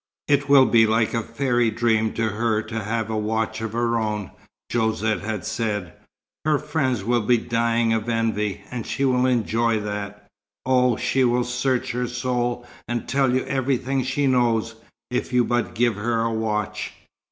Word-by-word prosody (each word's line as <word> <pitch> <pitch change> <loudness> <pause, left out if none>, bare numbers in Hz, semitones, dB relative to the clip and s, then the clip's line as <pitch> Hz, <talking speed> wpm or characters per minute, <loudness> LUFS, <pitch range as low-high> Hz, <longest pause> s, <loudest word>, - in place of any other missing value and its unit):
"It 145 -1 +2
will 140 -2 +7
be 115 -2 +5
like 110 0 +1
a 115 - +1
fairy 120 0 0
dream 110 -1 +1
to 115 -1 0
her 110 +1 0
to 110 0 -5
have 110 +1 -2
a - - -1
watch 110 +1 -1
of 110 -1 -4
her 115 0 +1
own," 105 -3 -3 0.4
Josette 110 -1 0
had 105 -1 -4
said. 105 -6 -2 0.5
"Her 155 -1 +3
friends 140 -7 -1
will 120 +2 +1
be 120 +3 +3
dying 115 0 +1
of 110 +1 -1
envy, 110 -3 -1
and 120 -3 -5
she 140 - -1
will 130 -1 +3
enjoy 115 -2 +1
that. 105 0 -5 0.4
Oh, 125 -2 +3
she 130 - +1
will 125 0 +2
search 125 +1 -1
her 125 +1 -2
soul 125 0 -2 0.2
and 120 -1 -3
tell 135 -1 +2
you 130 +1 0
everything 135 0 0
she 135 +3 0
knows, 120 -4 +2 0.4
if 125 - -2
you 125 -1 +4
but 120 0 -1
give 120 0 +2
her 115 +2 0
a 115 0 0
watch!" 105 -2 -2
115 Hz, 175 wpm, -23 LUFS, 110-125 Hz, 0.5 s, will